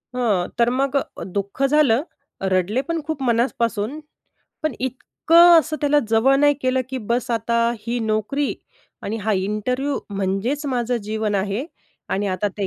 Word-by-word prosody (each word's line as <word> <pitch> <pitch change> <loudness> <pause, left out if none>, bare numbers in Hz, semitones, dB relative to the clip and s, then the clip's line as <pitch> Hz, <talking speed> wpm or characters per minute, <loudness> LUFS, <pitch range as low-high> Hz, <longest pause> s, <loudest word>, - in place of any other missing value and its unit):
हां. 210 -8 +1
तर 235 0 +3
मग 270 +2 0
अ, - - -4
दुःख 200 +7 -3
झालं, 275 -2 +3 0.5
रडले 195 +8 +1
पण 335 -1 -1
खूप 315 -3 -4
मनापासून. 235 +1 0 0.6
पण 310 -3 0
इतकं 330 +7 +4
असं 310 -1 -1
त्याला 295 0 +3
जवळ 225 +5 +4
नाही 290 +1 +4
केलं, 255 0 +1
की 265 - -3
बस 245 +1 0
आता 235 0 0 0.2
ही 235 +3 -3
नोकरी, 220 +6 -1 0.5
आणि 220 +3 -3
हा 220 - +1
इंटरव्ह्यू 215 +8 -1
म्हणजेच 200 +9 -1
माझं 245 -2 0
जीवन 215 -1 -1
आहे. 200 +5 -1 0.4
आणि 205 +1 -1
आता 190 +2 -1
ते 200 - 0
240 Hz, 150 wpm, -21 LUFS, 210-275 Hz, 0.6 s, इतकं